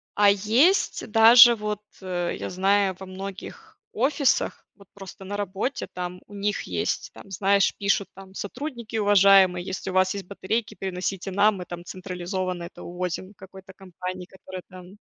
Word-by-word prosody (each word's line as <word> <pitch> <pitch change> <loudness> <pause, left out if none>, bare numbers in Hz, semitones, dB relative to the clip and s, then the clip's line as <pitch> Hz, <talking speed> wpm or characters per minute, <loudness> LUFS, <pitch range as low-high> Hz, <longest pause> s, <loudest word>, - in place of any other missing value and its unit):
А 205 0 +5
есть 225 - +2
даже 235 +2 +8
вот, 210 -1 -4 0.2
э, 175 -2 -3
я - - -5
знаю, 190 +1 +2
во 190 - -8
многих 190 +1 -9
офисах 275 +2 0
вот 200 -2 -19
просто 195 -1 -11
на 205 +2 -5
работе, 205 +7 -3
там 180 0 -5
у - - -16
них 205 +1 -2
есть - - -3
там, - - -14
знаешь, 195 +1 +2
пишут 200 0 +1
там: 190 0 -13
"Сотрудники 235 +2 -6
уважаемые, 195 -3 +5
если 190 +1 -5
у - - -8
вас 185 0 +3
есть 200 -2 -6
батарейки, 205 +4 -3
приносите 190 +1 -4
нам, 200 +2 +3
мы 180 - -7
там 175 0 -8
централизованно 185 0 -4
это 170 - -10
увозим 180 +2 -5
какой-то 190 0 -13
компании, 185 -1 -7
которая 185 -1 -10
там 185 +1 -13
195 Hz, 160 wpm, -25 LUFS, 185-205 Hz, 0.2 s, даже